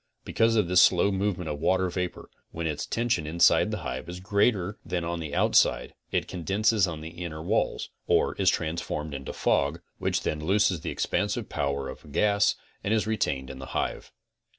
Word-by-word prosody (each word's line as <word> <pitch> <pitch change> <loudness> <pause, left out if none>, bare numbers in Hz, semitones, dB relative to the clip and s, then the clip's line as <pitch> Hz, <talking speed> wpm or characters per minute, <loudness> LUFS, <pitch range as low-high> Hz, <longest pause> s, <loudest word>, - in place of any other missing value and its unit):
Because 115 0 +2
of 105 -5 +3
this 90 0 +5
slow 90 +2 +5
movement 95 -3 -1
of 75 -1 -3
water 95 +3 +2
vapor, 90 0 -4 0.2
when 85 0 -5
its 75 -2 -2
tention 115 -10 0
inside 85 +2 +4
the - - -2
hive 65 +5 -4
is 90 +1 -6
greater 100 0 +1
than 90 0 -2
on 85 0 -3
the 75 -3 -5
outside - - +3 0.2
it - - 0
condenses 100 +4 +1
on 80 -3 -5
the 80 - -6
inner 85 -2 -6
walls, 105 +7 -1 0.2
or - - +3
is 95 -3 +4
transformed 80 -3 -2
into 70 -1 -5
fog, 70 +4 +1 0.2
which - - 0
then 75 0 -2
looses 95 -1 +2
the - - -4
expansive 105 +2 -1
power 70 -2 -2
of - - -9
a - - -15
gas 100 +7 +2 0.3
and 105 +2 +1
is 110 - +1
retained 70 -12 -1
in 65 - -9
the 65 - -8
hive. - - -3
90 Hz, 190 wpm, -27 LUFS, 80-100 Hz, 0.3 s, this